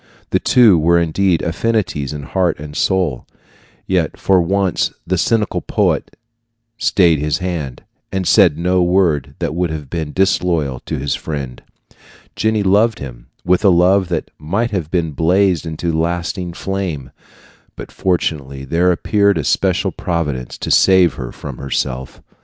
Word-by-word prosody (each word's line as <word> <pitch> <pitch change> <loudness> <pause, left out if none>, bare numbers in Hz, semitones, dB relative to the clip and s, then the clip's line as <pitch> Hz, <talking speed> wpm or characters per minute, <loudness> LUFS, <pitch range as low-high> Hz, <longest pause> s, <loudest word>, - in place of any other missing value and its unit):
The - - +2
two 110 -9 +5
were 85 +2 +3
indeed 85 +1 +1
affinities 85 -5 -1
in 75 -2 -6
heart 90 +4 0
and 75 0 -9
soul; 90 -10 0 0.6
yet - - 0
for 95 -2 +3
once 95 +1 0
the 95 - 0
cynical 110 +4 0
poet - - -1 0.6
stayed 85 -9 +3
his 75 0 0
hand, 85 -9 -4 0.3
and 95 -2 -2
said 75 - +5
no 90 +2 +1
word 85 -5 +1
that - - -3
would 90 +1 -1
have 75 -4 -6
been 80 -3 -3
disloyal 85 -8 0
to - - -2
his 70 +1 -2
friend. 70 -5 -5 0.7
Jenny 110 -1 +1
loved 105 +4 +3
him - - -9 0.2
with 90 +3 +2
a 100 - +6
love 90 +2 +4
that 85 - -3
might 100 +10 -1
have 90 -7 -3
blazed 85 +2 +1
into 80 +2 -3
a - - 0
lasting 85 +1 -3
flame; 90 -9 -4 0.6
but - - -9
fortunately 70 -7 -2
there 85 +6 +2
appeared 100 +3 +2
a - - -1
special - - +1
providence 75 -8 -3
to - - -4
save 95 -3 +5
her - - -7
from - - -9
herself. 65 -1 -4
85 Hz, 150 wpm, -17 LUFS, 75-95 Hz, 0.7 s, a